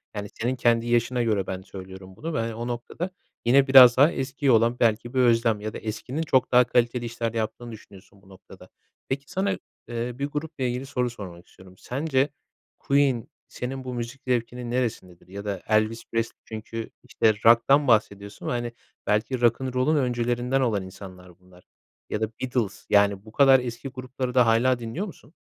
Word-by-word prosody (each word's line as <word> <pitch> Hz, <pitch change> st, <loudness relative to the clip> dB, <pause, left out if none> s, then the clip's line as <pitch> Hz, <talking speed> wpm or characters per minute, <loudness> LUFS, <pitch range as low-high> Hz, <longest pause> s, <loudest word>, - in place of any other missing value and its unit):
yani 105 Hz, -1 st, -5 dB
senin 120 Hz, +3 st, -2 dB
kendi 120 Hz, -1 st, +2 dB
yaşına 120 Hz, +1 st, +1 dB
göre 105 Hz, -5 st, 0 dB
ben 95 Hz, 0 st, -4 dB
söylüyorum 95 Hz, 0 st, -11 dB
bunu 160 Hz, -, -5 dB
ve, -, -, -1 dB
hani, 115 Hz, 0 st, -3 dB
o 120 Hz, +1 st, -5 dB
noktada 120 Hz, +9 st, -4 dB, 0.4 s
yine 135 Hz, +3 st, +5 dB
biraz 130 Hz, -2 st, +9 dB
daha 145 Hz, +5 st, +6 dB
eskiye 135 Hz, -1 st, -1 dB
olan 115 Hz, +1 st, +3 dB
belki 115 Hz, +2 st, +1 dB
bir 130 Hz, -, +1 dB
özlem 115 Hz, -3 st, +3 dB
ya 110 Hz, 0 st, -5 dB
da -, -, -5 dB
eskinin 115 Hz, +7 st, -4 dB
çok 130 Hz, -5 st, +1 dB
daha 125 Hz, 0 st, +7 dB
kaliteli 120 Hz, 0 st, 0 dB
işler 115 Hz, -1 st, -3 dB
yaptığını 115 Hz, +1 st, -4 dB
düşünüyorsun 100 Hz, -2 st, -15 dB
bu 95 Hz, -, -21 dB
noktada. 95 Hz, -1 st, -15 dB, 0.4 s
Peki 135 Hz, +1 st, -4 dB
sana, 195 Hz, +1 st, 0 dB, 0.4 s
eee, 120 Hz, +1 st, -3 dB
bir 140 Hz, -, 0 dB
grupla 150 Hz, 0 st, -5 dB
ilgili 125 Hz, +1 st, -2 dB
soru 125 Hz, -2 st, -1 dB
sormak 95 Hz, -6 st, -10 dB
istiyorum. 95 Hz, 0 st, -17 dB
Sence 135 Hz, +3 st, -1 dB, 0.5 s
Queen 140 Hz, -4 st, +1 dB, 0.2 s
senin 130 Hz, +2 st, -6 dB
bu 130 Hz, -1 st, -5 dB
müzik 120 Hz, +2 st, -6 dB
zevkinin 120 Hz, 0 st, -2 dB
neresindedir? 110 Hz, -9 st, -3 dB
Ya 100 Hz, +2 st, -8 dB
da 100 Hz, -3 st, -3 dB
Elvis 110 Hz, +1 st, +1 dB
Presley, 115 Hz, 0 st, -2 dB
çünkü, 110 Hz, +1 st, -6 dB
işte, 110 Hz, -, +2 dB
rock'tan 125 Hz, +5 st, +5 dB
bahsediyorsun 100 Hz, -3 st, 0 dB
ve, -, -, -1 dB
hani, 120 Hz, -1 st, -2 dB, 0.4 s
belki 110 Hz, +4 st, 0 dB
Rock 120 Hz, +1 st, +3 dB
and 130 Hz, -1 st, -3 dB
roll'un 130 Hz, +5 st, +2 dB
öncülerinden 125 Hz, 0 st, 0 dB
olan 110 Hz, -6 st, 0 dB
insanlar 90 Hz, -1 st, -12 dB
bunlar 90 Hz, -1 st, -20 dB, 0.5 s
ya 105 Hz, -, -3 dB
da 110 Hz, -, +1 dB
Beatles, 125 Hz, -6 st, -2 dB
yani, 100 Hz, -1 st, +3 dB
bu 110 Hz, -, -12 dB
kadar 135 Hz, +1 st, +6 dB
eski 120 Hz, +1 st, -6 dB
grupları 130 Hz, -1 st, -5 dB
da 125 Hz, -1 st, +5 dB
hâlâ 120 Hz, +2 st, +3 dB
dinliyor 120 Hz, -, -4 dB
musun? 155 Hz, -, -13 dB
120 Hz, 180 wpm, -25 LUFS, 110-130 Hz, 0.5 s, biraz